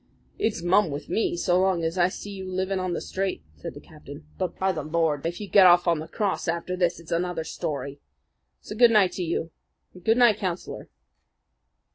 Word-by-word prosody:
"It's 210 Hz, -6 st, -1 dB
mum 185 Hz, +1 st, +3 dB
with 145 Hz, +1 st, -6 dB
me 220 Hz, -5 st, 0 dB
so 180 Hz, +1 st, +2 dB
long 185 Hz, -3 st, +1 dB
as 165 Hz, +1 st, -1 dB
I 180 Hz, -1 st, +3 dB
see 205 Hz, +2 st, -8 dB
you 190 Hz, -1 st, -7 dB
living 190 Hz, +1 st, -1 dB
on 185 Hz, -1 st, -2 dB
the -, -, -3 dB
straight," 195 Hz, 0 st, -3 dB
said 75 Hz, -, -8 dB
the -, -, -8 dB
captain. 150 Hz, 0 st, -13 dB
"But, 185 Hz, -2 st, -3 dB
by 190 Hz, 0 st, +1 dB
the 160 Hz, -, -4 dB
Lord! 155 Hz, -1 st, 0 dB
if 170 Hz, -, -5 dB
you 210 Hz, -, -6 dB
get 190 Hz, -1 st, +7 dB
off 175 Hz, 0 st, +5 dB
after 170 Hz, +1 st, -1 dB
this, 175 Hz, -2 st, 0 dB
it's 165 Hz, -, -13 dB
another 175 Hz, -1 st, -1 dB
story! 140 Hz, -3 st, -5 dB, 0.6 s
So 210 Hz, -, -8 dB
good 240 Hz, +1 st, +6 dB
night 210 Hz, -5 st, +4 dB
to 185 Hz, -, -4 dB
you 165 Hz, -1 st, -2 dB, 0.4 s
and 180 Hz, -, -15 dB
good 225 Hz, +4 st, +3 dB
night, 240 Hz, -4 st, +5 dB
Councillor." 185 Hz, -3 st, -5 dB
180 Hz, 195 wpm, -25 LUFS, 165-190 Hz, 0.6 s, get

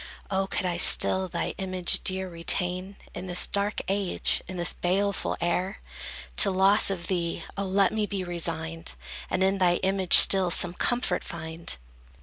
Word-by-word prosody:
O 195 Hz, 0 st, -1 dB
could 195 Hz, -, -4 dB
I 175 Hz, -1 st, -3 dB
still 190 Hz, +1 st, +5 dB
thy 170 Hz, -1 st, -5 dB
image 185 Hz, -2 st, 0 dB
dear 190 Hz, 0 st, +1 dB
retain, 180 Hz, +2 st, -2 dB, 0.2 s
In 190 Hz, -, -8 dB
this 180 Hz, 0 st, +2 dB
dark 200 Hz, +1 st, -2 dB
age, 195 Hz, -1 st, 0 dB
and 185 Hz, -, -8 dB
in -, -, -8 dB
this 175 Hz, -1 st, 0 dB
baleful 195 Hz, +2 st, -2 dB
air! 180 Hz, +3 st, -3 dB, 0.6 s
To 200 Hz, -, +5 dB
loss 195 Hz, +3 st, +3 dB
of 180 Hz, -3 st, -5 dB
thee, 170 Hz, -2 st, -4 dB
O 200 Hz, -, -4 dB
let 195 Hz, +1 st, 0 dB
me 215 Hz, -1 st, -2 dB
be 195 Hz, -2 st, -5 dB
resigned, 165 Hz, -1 st, -5 dB, 0.4 s
And 185 Hz, -, -1 dB
in 195 Hz, +1 st, 0 dB
thy 175 Hz, -2 st, +2 dB
image 190 Hz, -1 st, +3 dB
still 190 Hz, -2 st, +8 dB
some 175 Hz, 0 st, +1 dB
comfort 245 Hz, +6 st, -2 dB
find! 160 Hz, -, -5 dB
185 Hz, 165 wpm, -25 LUFS, 175-195 Hz, 0.6 s, still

